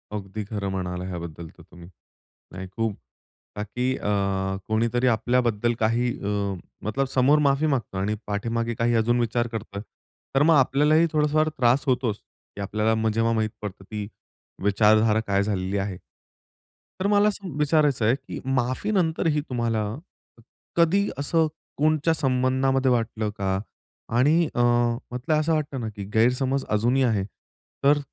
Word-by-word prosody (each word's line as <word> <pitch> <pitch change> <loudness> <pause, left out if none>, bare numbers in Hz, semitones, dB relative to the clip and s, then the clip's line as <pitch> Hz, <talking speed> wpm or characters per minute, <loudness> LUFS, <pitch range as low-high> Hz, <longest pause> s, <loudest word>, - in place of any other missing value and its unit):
अगदी 105 +1 -5
खरं 100 -3 -3
म्हणाला 90 -1 -3
ह्याबद्दल 85 -2 -6
तर - - -14
तुम्ही. 85 0 -14 0.6
नाही 95 0 -7
खूप 115 -3 -1 0.6
बाकी 105 +4 -3
अ, - - -3 0.6
कोणीतरी 115 +3 +1
आपल्याबद्दल 120 -1 +1
काही 115 +3 +1 0.2
अ, - - -1 0.6
मतलब 135 +6 0
समोर 135 +3 +4
माफी 140 +2 +2
मागतो 125 -9 -1
आणि 100 +3 -1
पाठीमागे 115 +3 -2
काही 115 +1 +1
अजून 120 +2 +2
विचार 120 0 0
करतोय. 110 -3 -6 0.5
तर 135 - +5
मग 165 +1 +5
आपल्यालाही 150 +4 +4
थोडासा 150 -1 +1
फार 155 0 +3
त्रास 125 +2 +3
होतोच, 125 -4 +1 0.4
की 100 - -6
आपल्याला 110 +2 0
जेव्हा 115 +1 +1
माहीत 110 -1 0
पडतं, 100 -2 -7
की 105 -1 -4 0.6
विचारधारा 110 +2 +4
काय 100 0 +2
झालेली 100 -1 -2
आहे. 95 -2 -3 1.0
तर 190 - +1
मला 205 0 +4
असं 195 -7 -3
विचारायचं 150 -5 +2
आहे, 115 +4 +4
की 135 -1 -8
माफी 130 - 0
नंतरही 160 -5 +1
तुम्हाला 115 -3 0 0.9
कधी 175 +4 +3
असं 160 +3 +2 0.3
कोणच्या 155 +2 +2
संबंधामध्ये 130 -1 +1
वाटलं 115 -2 0
का? 95 -1 0 0.6
आणि 155 +7 +4
अ, 120 - +2
म्हटलं 120 +4 0
असं 160 +2 +1
वाटतं 145 -3 -2
ना, 110 - -3
की 100 - -6
गैरसमज 125 +4 +2
अजूनही 120 +5 +2
आहे. 110 -6 +1 0.6
तर 145 +1 +5
120 Hz, 145 wpm, -25 LUFS, 105-140 Hz, 1.0 s, तर